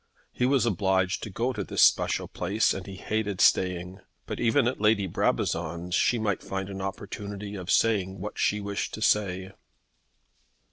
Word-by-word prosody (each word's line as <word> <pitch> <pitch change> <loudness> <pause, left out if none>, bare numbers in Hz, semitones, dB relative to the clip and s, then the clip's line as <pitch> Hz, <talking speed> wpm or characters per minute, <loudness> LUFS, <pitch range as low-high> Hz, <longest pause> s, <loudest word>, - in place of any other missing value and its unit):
He 125 - 0
was 135 -2 +3
obliged 95 -3 +1
to - - -5
go 120 +6 -1
to 105 -4 -3
this - - +2
special - - +3
place 105 +3 0
and 95 0 -7
he 100 - -7
hated 105 0 -2
staying. 90 +1 +2 0.3
But - - -5
even 120 +2 +3
at 125 - -2
Lady 105 -2 +3
Brabazon's 85 0 -1
she 120 - +3
might 105 -4 -1
find 95 0 -4
an 95 0 -6
opportunity 100 +1 -6
of 95 -3 -7
saying 95 -4 +2
what 105 +3 -6
she 105 - +2
wished 100 0 -3
to 110 - -9
say. 95 -3 +1
100 Hz, 170 wpm, -27 LUFS, 95-110 Hz, 0.3 s, was